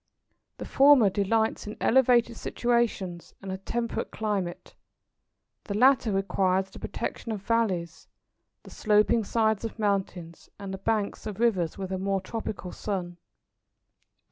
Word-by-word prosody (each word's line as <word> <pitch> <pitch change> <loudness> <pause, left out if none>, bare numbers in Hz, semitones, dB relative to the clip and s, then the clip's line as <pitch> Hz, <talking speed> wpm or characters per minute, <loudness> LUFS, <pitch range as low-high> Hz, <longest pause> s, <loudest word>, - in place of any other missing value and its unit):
The - - -6
former 270 -7 +5
delights 220 +3 0
in 210 - -7
elevated 240 -2 +3
situations 225 -9 -1
and 195 - -7
a 190 - -5
temperate 235 +4 -3
climate; 200 -5 -3 0.9
the 200 - -4
latter 255 -1 +4
requires 190 -1 0
the - - -11
protection 230 - -5
of 205 -3 -5
valleys, 200 -8 -1 0.6
the - - -13
sloping 215 +2 +2
sides 220 0 +1
of 225 - -5
mountains, 190 -5 -2
and 195 -1 -7
the 190 - -6
banks 215 +1 -2
of 210 -1 -6
rivers, 190 -9 +1
with 190 -1 -5
a 190 - -2
more 195 0 0
tropical 195 -2 -6
sun. 180 -4 -4
205 Hz, 135 wpm, -27 LUFS, 190-230 Hz, 0.9 s, former